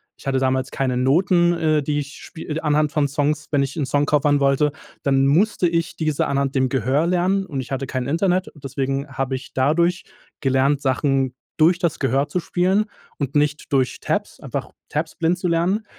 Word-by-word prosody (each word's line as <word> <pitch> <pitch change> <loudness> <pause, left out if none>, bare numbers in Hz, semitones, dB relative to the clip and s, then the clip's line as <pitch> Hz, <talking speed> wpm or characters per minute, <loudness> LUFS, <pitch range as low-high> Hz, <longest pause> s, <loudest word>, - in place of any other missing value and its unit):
ich - - -13
hatte 135 -1 +1
damals 130 0 0
keine 130 -2 -1
Noten, 175 +7 +3
äh, 155 -2 +2
die 150 +1 -1
ich 145 0 -6
spie 160 -1 -6
anhand 150 0 +2
von 145 -2 +1
Songs, 150 +1 -1
wenn 140 -2 +3
ich 135 0 -4
'nen 150 -5 -1
Song 145 +2 +1
covern 145 0 +2
wollte, 140 +1 +2 0.3
dann 135 -1 +3
musste 180 +5 +3
ich 170 0 -1
diese 155 -3 0
anhand 140 -1 -1
dem 130 -1 +2
Gehör 135 +5 +1
lernen 185 +2 +1
und 140 -6 -5
ich 130 - -6
hatte 135 0 -2
kein 130 -1 -3
Internet 180 +4 +1
deswegen 135 0 -3
habe 135 0 -2
ich 130 0 -8
dadurch 170 +7 +1 0.3
gelernt, 135 +1 +2
Sachen 135 -1 +1 0.2
durch 170 +3 +5
das 170 -3 -1
Gehör 135 +2 +1
zu 170 +5 -1
spielen 185 +5 +1 0.3
und 140 -1 -3
nicht 150 0 0
durch 130 -2 +1
Tabs, - - -2
einfach - - -5 0.2
Tabs 155 +2 -3
blind 170 +1 +1
zu 180 - -2
lernen 175 +6 +1
145 Hz, 190 wpm, -22 LUFS, 135-165 Hz, 0.3 s, durch